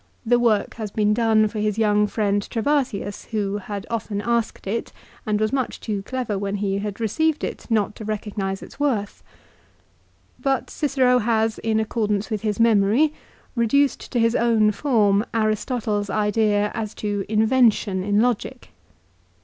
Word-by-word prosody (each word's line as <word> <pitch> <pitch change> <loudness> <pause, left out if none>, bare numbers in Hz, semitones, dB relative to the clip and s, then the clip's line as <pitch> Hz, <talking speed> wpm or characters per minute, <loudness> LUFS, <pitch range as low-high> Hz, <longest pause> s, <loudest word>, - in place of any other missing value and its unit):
The 240 +1 +3
work 225 -4 +2
has 215 -2 -4
been 210 +1 +1
done 220 -1 +3
for 215 +1 -5
his 210 0 0
young 210 -1 +3
friend 205 -1 0
Trebatius, 230 -3 -1
who 205 -2 -2
had 200 0 -6
often 215 -3 -2
asked 235 +1 -1
it 220 +4 -3 0.4
and 210 -1 +1
was 215 +2 0
much 265 -2 -1
too 210 -3 -3
clever 230 -2 -3
when 200 0 -2
he 200 -1 -1
had 205 0 -5
received 305 +8 0
it - - -5
not 215 -2 +1
to - - -7
recognise 205 -2 -3
its - - -13
worth. 235 -9 -1 1.2
But 270 -2 -1
Cicero 260 -4 +2
has, 225 -1 0
in 220 -1 0
accordance 215 -1 -1
with 215 -2 -1
his 210 -1 -2
memory, 230 +6 +4 0.4
reduced 270 +4 +1
to 245 - +2
his 230 +1 +2
own 225 -3 +3
form 210 -4 +2
Aristotle's 215 -1 -1
idea 210 0 +1
as 215 -2 -4
to 205 -2 -2
"invention" 220 -3 +2
in 205 +1 +2
logic. 240 -2 -2
215 Hz, 155 wpm, -23 LUFS, 205-235 Hz, 1.2 s, memory